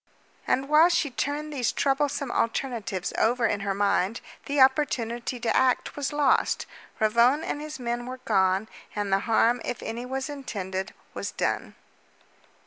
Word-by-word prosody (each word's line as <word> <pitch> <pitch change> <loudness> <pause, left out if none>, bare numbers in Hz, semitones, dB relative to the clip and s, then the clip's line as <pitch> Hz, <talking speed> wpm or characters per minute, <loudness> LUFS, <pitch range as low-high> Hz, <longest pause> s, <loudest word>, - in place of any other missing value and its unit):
And 265 +2 +1
while 310 +4 +6
she 315 -5 +1
turned 290 +4 -3
these 250 -5 0
troublesome 280 -1 0
alternatives 225 -6 -2
over 235 +1 +2
in 205 -2 +1
her 195 0 -2
mind, 200 +1 +1 0.3
the 285 0 0
opportunity 245 -3 +2
to 235 -1 0
act 260 -1 +2
was 285 0 -2
lost. 290 -2 +2 0.3
Ravone 235 +7 +4
and 290 - -3
his 305 -1 -7
men 240 0 -3
were 255 0 -5
gone, 190 0 +2 0.3
and 205 -2 -1
the 195 - +4
harm, 230 +2 +3
if 245 - -4
any 235 +2 -5
was 265 +1 -3
intended, 200 -9 -5 0.2
was - - -4
done. - - -2
245 Hz, 150 wpm, -26 LUFS, 215-275 Hz, 0.3 s, while